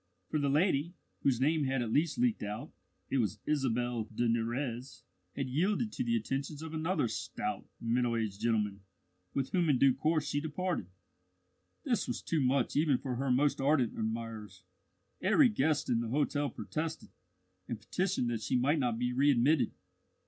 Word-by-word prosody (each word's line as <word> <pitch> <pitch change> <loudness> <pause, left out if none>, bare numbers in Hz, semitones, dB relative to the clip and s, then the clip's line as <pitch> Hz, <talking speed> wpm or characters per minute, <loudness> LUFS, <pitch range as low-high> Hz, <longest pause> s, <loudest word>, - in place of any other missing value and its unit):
For 155 - 0
the 140 -1 +1
lady, 155 +2 +2 0.3
whose 130 -4 +2
name 150 +2 +2
had 135 -2 0
at 115 -1 -3
last 160 +5 +2
leaked 240 -2 +2
out 105 +1 -5 0.4
it 135 - +2
was 105 -3 0
Isabelle 120 -5 0
de 115 +2 -1
Nurrez 120 +3 -2 0.3
had 135 -2 -2
yielded 195 - 0
to - - -2
the 115 -1 +1
attentions 135 +6 -3
of 160 0 -7
another 160 -3 0
stout, - - -4
middle 120 +1 +1
aged 105 -3 -3
gentleman, 105 -4 0 0.5
with 135 -1 -1
whom 175 -3 +2
in 140 - +4
due 135 0 +5
course 155 +1 +1
she 145 0 0
departed. 165 - -2 1.0
This 250 -5 0
was - - -3
too 160 -3 0
much 135 +1 +1
even 145 -3 +3
for 125 -2 -4
her 135 +1 -1
most 135 +3 +2
ardent 135 -4 +2
admirers. 110 -3 -4 0.6
Every 230 +8 +5
guest 150 - +1
in 120 -2 +2
the 115 -1 -2
hotel 145 +2 +1
protested, 160 +1 -4 0.6
and 115 - -4
petitioned 125 - -1
that 115 -2 -2
she 110 - -1
might 140 +5 +3
not 120 -4 0
be 125 +1 -1
readmitted. 135 0 +3
135 Hz, 170 wpm, -32 LUFS, 115-155 Hz, 1.0 s, due